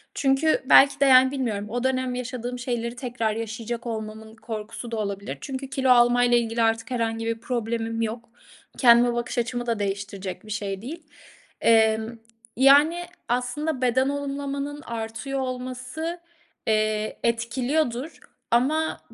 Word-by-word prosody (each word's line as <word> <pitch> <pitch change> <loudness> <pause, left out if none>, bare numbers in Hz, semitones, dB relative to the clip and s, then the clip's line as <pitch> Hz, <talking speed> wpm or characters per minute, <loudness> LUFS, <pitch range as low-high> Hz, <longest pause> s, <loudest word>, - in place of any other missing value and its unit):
Çünkü 275 +3 +2
belki 275 +1 +7
de, 280 - +4
yani 260 0 +7
bilmiyorum 230 -7 -2
o 245 +2 -2
dönem 255 -1 0
yaşadığım 250 0 -5
şeyleri 240 -1 -3
tekrar 240 -3 -2
yaşayacak 230 +1 -5
olmamın 220 0 -6
korkusu 225 +1 -7
da 225 - -2
olabilir 200 -8 -4
çünkü 270 0 -5
kilo 265 -1 0
alma 245 0 +5
ile 240 0 +4
ilgili 230 0 -2
artık 225 +2 +1
herhangi 225 -2 -1
bir 230 0 -2
problemim 230 -1 -2
yok. 230 +1 -4 0.5
Kendime 240 -1 +6
bakış 240 +1 -3
açımı 240 +1 -1
da 230 -3 -1
değiştirecek 200 0 -4
bir 215 - -9
şey 200 -2 -3
değil. 315 +8 -7 0.6
Emm, 220 0 +3 0.4
yani 290 +6 +5 0.3
aslında 255 +4 -1
beden 260 +2 +2
olumlamanın 285 0 -4
artıyor 230 +4 -4
olması, 255 +6 -4 0.5
eee, 215 0 0
etkiliyordur 245 +4 -1 0.3
ama 300 +7 +1
240 Hz, 135 wpm, -25 LUFS, 225-260 Hz, 0.6 s, belki